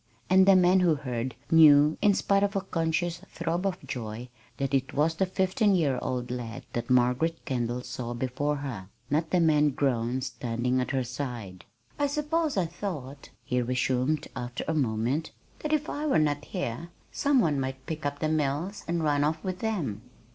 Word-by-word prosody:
And 190 0 +6
the 195 - +8
man 185 +1 +5
who 175 -4 +4
heard 125 -3 -4 0.2
knew, 150 -2 +7
in 205 -1 +4
spite 200 0 +2
of 200 0 0
a 195 - +1
conscious 165 -2 -1
throb 170 +3 -2
of 185 -1 -4
joy, 115 0 -5 0.3
that 135 0 -2
it 135 0 0
was 155 +3 +2
the 190 +3 0
fifteen 190 +2 +2
year 145 -7 +1
old 125 -1 -3
lad 120 -2 -5
that 120 0 -3
Margaret 125 +6 +2
Kendall 120 -1 -2
saw 120 -1 -5
before 135 +4 -1
her, 125 -10 -6 0.2
not 160 +2 +1
the 180 - +2
man 150 -3 +4
grown 130 -2 0
standing 125 -1 -1
at 125 - -3
her 135 -2 0
side. 120 -7 -6 0.3
"I 290 - +3
suppose 300 0 -1
I 185 - +2
thought," 155 -6 -6 0.2
he 125 0 0
resumed 130 +4 0
after 120 0 -4
a 160 - +1
moment, 130 +2 0 0.3
"that 305 - -3
if 310 -1 +1
I 300 +1 -3
were 280 - +3
not 145 -1 +1
here 170 - -4 0.2
some 285 -2 +2
one 150 - +2
might 130 0 -4
pick 160 -2 -5
up 145 0 -2
the 155 - -1
mills 155 +5 -1
and 170 -1 -1
run 145 -1 +2
off 155 +1 -1
with 185 -1 -3
them." 160 - -2
145 Hz, 185 wpm, -28 LUFS, 125-175 Hz, 0.3 s, the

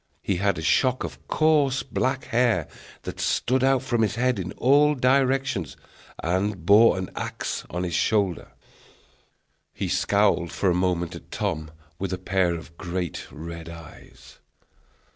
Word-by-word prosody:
He 95 - 0
had 100 +2 +1
a 80 - -5
shock 130 - +2
of - - -8
coarse 145 -5 +2
black 130 +2 -1
hair, 115 -10 +1 0.4
that - - -7
stood 130 +1 +1
out 135 -1 +3
from 120 -3 0
his 105 -2 +1
head 125 -2 +1
in 90 0 -4
all 145 +3 +4
directions, 130 - +1 0.5
and 95 +1 -1
bore 105 +2 +6
an 95 -1 -4
axe - - -4
on 90 +1 -3
his 90 -2 -3
shoulder. 100 -5 0 1.2
He 95 - -2
scowled 95 -1 +2
for 95 - +1
a - - +2
moment 90 -1 0
at - - -12
Tom 80 -7 -3 0.3
with 95 0 -3
a 95 - -2
pair 90 -1 +1
of 80 0 -10
great 90 -3 -4
red 85 +1 -8
eyes. 85 -1 -13
100 Hz, 150 wpm, -25 LUFS, 85-125 Hz, 1.2 s, bore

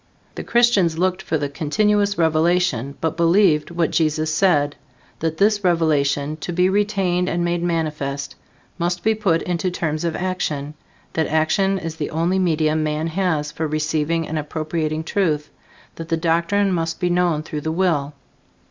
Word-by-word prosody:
The - - -6
Christians 220 -9 +3
looked 185 +1 0
for 160 - -1
the 145 -1 -2
continuous 205 +8 +1
revelation, 160 -5 +1
but 160 0 -1
believed 170 -2 +3
what 170 -2 0
Jesus 155 -1 +1
said, 155 -5 +2 0.4
that 160 0 -2
this 205 0 +2
revelation, 155 -4 +1
to 160 - -5
be 180 +2 +2
retained 190 -3 +1
and 175 0 -1
made 175 0 0
manifest, 150 -5 -2 0.5
must 175 +1 -1
be 220 - +3
put 195 -6 +1
into 180 +1 -1
terms 155 -3 -2
of 170 -1 -1
action; 155 -6 -3 0.4
that 160 -1 0
action 175 +5 +1
is 165 -3 -5
the 150 - -3
only 170 +4 0
medium 155 -3 +1
man 155 +1 -1
has 160 -4 -1
for 160 +1 -3
receiving 155 +1 -1
and 155 0 -2
appropriating 155 +1 -3
truth; 160 -5 -1 0.5
that 165 0 -7
the 165 - +1
doctrine 170 +5 +1
must 165 -2 -2
be 175 -1 0
known 175 -3 +1
through 150 -1 -5
the 160 - -2
will. 160 -5 0
165 Hz, 160 wpm, -21 LUFS, 155-180 Hz, 0.5 s, Christians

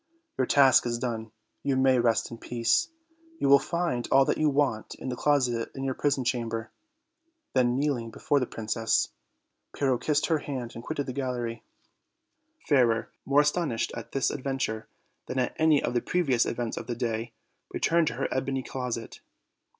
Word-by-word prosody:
Your 130 - 0
task 135 -2 +6 0.2
done, 115 -3 -3 0.3
you 140 -1 0
may 130 -1 +4
rest 120 -1 +1
in 115 - -8
peace; 115 -1 +1 0.5
you - - 0
will 140 0 +8
find 170 -9 -2
all 135 0 +6
that - - 0
you 155 - +4
want 135 -6 0
in - - -6
the 125 - -2
closet 125 -5 +1
in 135 - -5
your 135 -1 0
prison 140 -1 0
chamber;" 115 -2 -2 0.8
then, 125 -1 +3
kneeling 135 -5 0
before 145 +5 0
the 125 - -1
princess, 115 +1 0 0.6
Pyrrho 130 -4 +1
kissed 150 -1 +1
her 160 -2 +1
hand 130 -5 -5
and 115 - -8
quitted 145 -1 -3
the 130 - -5
gallery. 125 -3 -3 1.1
Fairer, 120 -6 +3 0.2
more 140 +2 +5
astonished 150 -5 0
at 115 - -8
this 135 - +1
adventure 135 -6 -3 0.4
than 130 - -4
at 125 -1 0
any 155 -2 +4
of - - -1
the 120 - +1
previous 140 -10 +1
events 120 -1 -3
of - - -6
the 120 - -2
day, 115 -1 -3 0.4
returned 170 -1 +2
to - - -1
her - - -1
ebony 130 0 -1
closet. 125 -4 -5
130 Hz, 170 wpm, -28 LUFS, 115-140 Hz, 1.1 s, will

